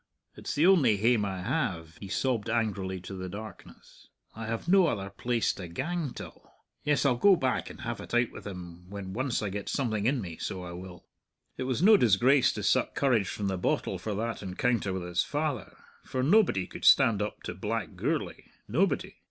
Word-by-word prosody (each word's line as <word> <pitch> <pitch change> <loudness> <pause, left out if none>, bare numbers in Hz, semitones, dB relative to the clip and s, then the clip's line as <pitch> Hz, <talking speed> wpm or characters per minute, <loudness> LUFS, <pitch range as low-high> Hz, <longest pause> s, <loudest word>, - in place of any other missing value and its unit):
"It's - - -5
the 150 - +3
only 150 - +5
hame 110 0 +3
I 95 -2 -4
have," 85 - -2
he 100 - -8
sobbed 115 +2 -1
angrily 100 -5 -1
to 95 - -8
the 95 -1 -5
darkness; 105 0 -11 0.3
"I 115 0 -6
have 115 +7 -4
no 190 -1 +5
other 100 -8 -2
place 120 +3 0
to 90 - -7
gang 145 - -3
till! - - -10 0.3
Yes, 150 -1 +1
I'll 125 -3 +3
go 195 +9 +6
back 130 -6 -1
and - - -11
have 120 -2 -4
it - - -10
out 120 0 +2
with - - -9
him 90 -2 -9
when 100 -1 -6
once 130 +1 -1
I 105 - -1
get 100 +1 -4
something 110 -6 0
in 135 0 +2
me, 85 -7 -6
so 95 -1 -4
I 90 - -7
will." 90 0 -10 0.5
It 130 - -4
was 130 +5 -1
no 215 +2 +8
disgrace 125 - +4
to - - -5
suck - - +2
courage 120 -8 +2
from 105 - -4
the 95 -2 -1
bottle - - -1
for 105 -2 -3
that 115 +2 -3
encounter 105 +2 0
with 95 -1 -3
his 90 0 0
father, 145 -8 -3 0.3
for 130 - -2
nobody 160 - +4
could - - -10
stand 105 -3 +6
up 105 0 -4
to - - -4
black - - -3
Gourlay - - -2 0.2
nobody. - - 0
110 Hz, 200 wpm, -29 LUFS, 95-130 Hz, 0.5 s, no